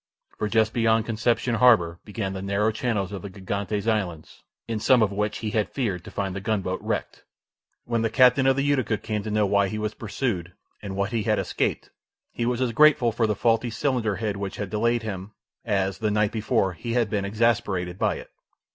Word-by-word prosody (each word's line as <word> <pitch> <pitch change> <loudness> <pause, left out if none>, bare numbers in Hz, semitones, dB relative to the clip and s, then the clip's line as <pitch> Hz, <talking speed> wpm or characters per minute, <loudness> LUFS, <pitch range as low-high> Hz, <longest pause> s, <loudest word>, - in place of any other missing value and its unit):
For 105 - 0
just 110 0 +2
beyond 115 -1 +2
Concepcion 115 +2 0
harbour 105 -9 +4
began 105 -2 -4
the 95 - -5
narrow 100 +3 +1
channels 110 -4 -2
of 100 -3 -5
the 100 - -7
Gigantes 100 +2 -3
Islands, 95 -8 -2 0.3
in 115 -2 -2
some 120 +2 +4
of 105 - +1
which 105 +1 -1
he 105 - -1
had 105 -3 0
feared 100 -10 -2
to - - -10
find 95 -2 -3
the 100 - -4
gunboat 95 -3 -1
wrecked. - - -3 0.6
When 115 -1 0
the 115 - +1
captain 130 +2 +5
of 135 - +4
the 135 - 0
Utica 130 -7 +1
came 105 -1 -3
to 110 - -5
know 105 0 +2
why 100 0 +2
he 110 - -4
was 105 0 -2
pursued, 100 -6 -3 0.3
and 100 -2 -6
what 100 +1 -1
he 115 -2 0
had 105 0 +1
escaped, - - -2 0.4
he 120 - -2
was 125 0 0
as 125 -2 +1
grateful 135 -2 +5
for 115 0 +1
the 105 - 0
faulty 115 +2 +1
cylinder 115 -2 0
head 105 -2 -2
which 100 -1 -4
had 100 -3 -5
delayed 115 +2 +1
him 100 -1 -6 0.3
as, 95 -3 -1
the 110 - 0
night 105 0 +1
before, 105 -4 0
he 115 +8 -5
had 120 -2 +2
been 100 -1 -1
exasperated 100 -4 0
by - - +1
it. - - -10
105 Hz, 210 wpm, -25 LUFS, 100-115 Hz, 0.6 s, captain